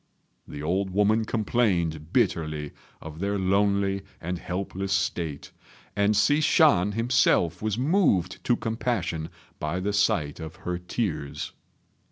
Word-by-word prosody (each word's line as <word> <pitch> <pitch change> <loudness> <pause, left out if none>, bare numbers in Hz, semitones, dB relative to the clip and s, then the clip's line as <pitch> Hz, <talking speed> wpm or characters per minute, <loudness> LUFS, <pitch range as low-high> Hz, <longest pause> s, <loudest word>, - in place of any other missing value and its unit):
The 75 - -7
old 95 +5 0
woman 105 +3 +2
complained 90 -9 0
bitterly 75 -3 0 0.3
of 80 0 -9
their 100 +2 -1
lonely 100 +1 +1 0.2
and 90 +1 -4
helpless 95 +1 -4
state, 80 -6 -2 0.4
and 105 +1 +2
Hsi 145 +7 +3
Shan 105 - +4
himself 115 -7 +2
was 110 -1 -1
moved 135 - +1
to 120 - +3
compassion 110 -9 -2 0.3
by 75 +4 -2
the 100 +2 -1
sight 85 -8 +1
of 80 -1 -7
her 90 0 -2
tears. 80 -7 -3
95 Hz, 125 wpm, -26 LUFS, 85-110 Hz, 0.4 s, Shan